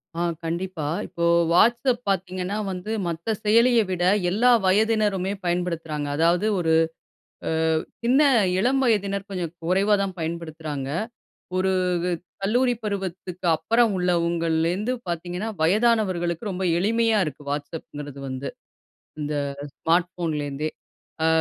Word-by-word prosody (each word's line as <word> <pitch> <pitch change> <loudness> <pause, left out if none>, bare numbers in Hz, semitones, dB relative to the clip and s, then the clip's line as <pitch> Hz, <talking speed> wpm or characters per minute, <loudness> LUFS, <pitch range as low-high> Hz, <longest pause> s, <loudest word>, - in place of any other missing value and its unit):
ஆ - - -4 0.2
கண்டிப்பா. 170 -1 -3 0.2
இப்போ 170 - -5 0.3
வாட்ஸ்அப் 240 +5 +3
பார்த்தீங்கன்னா 185 +1 -1
வந்து 185 +4 -5 0.2
மத்த 170 +6 -2
செயலிய 230 +3 +5
விட 180 -1 -1 0.3
எல்லா 230 +7 +4
வயதினருமே 205 -1 +2
பயன்படுத்துறாங்க. 165 -4 -2
அதாவது, 170 +5 +3
ஒரு 165 -2 +2 0.8
ஆ - - 0 0.5
சின்ன 255 +5 +4 0.4
இளம் 260 +6 +2
வயதினர் 200 -4 +1
கொஞ்சம் 180 -4 -4
குறைவா 195 +5 +2
தான் 190 -2 -4
பயன்படுத்துறாங்க. 160 -4 -4 0.7
ஒரு 190 +1 +2 0.7
கல்லூரி 245 +5 +2
பருவத்துக்கப்புறம் 190 +2 0
உள்ளவங்கள்லேருந்து 170 +3 +1
பார்த்தீங்கன்னா, 175 +4 -3
வயதானவர்களுக்கு 195 -1 +2
ரொம்ப 190 0 -3
எளிமையா 225 +4 +2
இருக்கு. 150 -1 -7
வாட்ஸ்அப்ங்கிறது 145 -1 -6
வந்து, 130 +1 -4 0.7
இந்த 150 0 -2 0.4
ஸ்மார்ட் 175 +2 +1
ஃபோன்லேருந்தே. 150 -4 -2 0.5
அ - - +4
180 Hz, 105 wpm, -24 LUFS, 165-210 Hz, 0.8 s, செயலிய